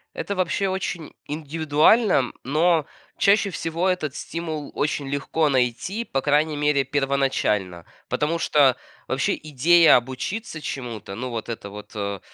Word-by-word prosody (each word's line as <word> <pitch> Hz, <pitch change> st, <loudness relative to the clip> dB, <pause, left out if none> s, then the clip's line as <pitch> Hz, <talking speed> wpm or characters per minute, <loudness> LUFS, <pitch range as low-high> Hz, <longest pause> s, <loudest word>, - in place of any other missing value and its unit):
Это 200 Hz, -, -3 dB
вообще 185 Hz, +2 st, 0 dB
очень 185 Hz, -4 st, -4 dB
индивидуально, 155 Hz, -, +2 dB
но 160 Hz, +2 st, +2 dB, 0.3 s
чаще 200 Hz, 0 st, +4 dB
всего 170 Hz, +1 st, -2 dB
этот 180 Hz, -7 st, -1 dB
стимул 160 Hz, -3 st, -5 dB
очень 145 Hz, -1 st, -1 dB
легко 140 Hz, +3 st, 0 dB
найти, 135 Hz, -, 0 dB
по 135 Hz, -11 st, -2 dB
крайней 150 Hz, +2 st, +2 dB
мере 145 Hz, -1 st, +2 dB
первоначально. 135 Hz, -10 st, 0 dB, 0.2 s
Потому 155 Hz, +3 st, 0 dB
что 145 Hz, -5 st, +4 dB, 0.3 s
вообще -, -, 0 dB
идея 160 Hz, +3 st, +5 dB
обучиться 130 Hz, -, -3 dB
чему-то, 120 Hz, -9 st, -6 dB
ну, 125 Hz, +3 st, -4 dB
вот 115 Hz, -2 st, -5 dB
это 110 Hz, -3 st, -6 dB
вот, 105 Hz, +1 st, -10 dB
э, 100 Hz, -1 st, -3 dB
150 Hz, 130 wpm, -23 LUFS, 130-165 Hz, 0.3 s, идея